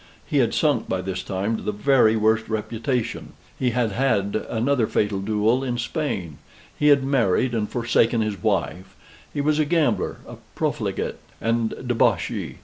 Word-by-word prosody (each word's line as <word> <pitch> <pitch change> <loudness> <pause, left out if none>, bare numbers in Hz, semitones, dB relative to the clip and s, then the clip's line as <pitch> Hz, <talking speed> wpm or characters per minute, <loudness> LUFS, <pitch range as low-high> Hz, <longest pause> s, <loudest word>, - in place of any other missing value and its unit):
He - - +1
had - - +2
sunk - - +1
by 95 - -1
this 95 0 -4
time 100 +4 -2
to - - -8
the - - -2
very 110 +1 +3
worst 110 0 +2
reputation; 115 +3 -3 0.3
he 125 - +2
had 120 -2 0
had 100 -4 0
another 120 0 +1
fatal 105 -2 0
duel 110 +5 +1
in 125 -2 -2
Spain; 120 - -3 0.4
he 150 - +1
had 140 -2 +5
married, 130 -3 +1
and 110 -2 -1
forsaken 120 -1 +2
his 105 -4 -2
wife; 95 +3 -1 0.4
he 145 - -2
was 150 +1 +1
a - - +4
gambler, 160 0 +1
a - - -9 0.2
profligate, - - -2 0.2
and 115 0 0
debauchee. 125 -2 0
115 Hz, 160 wpm, -23 LUFS, 105-130 Hz, 0.4 s, had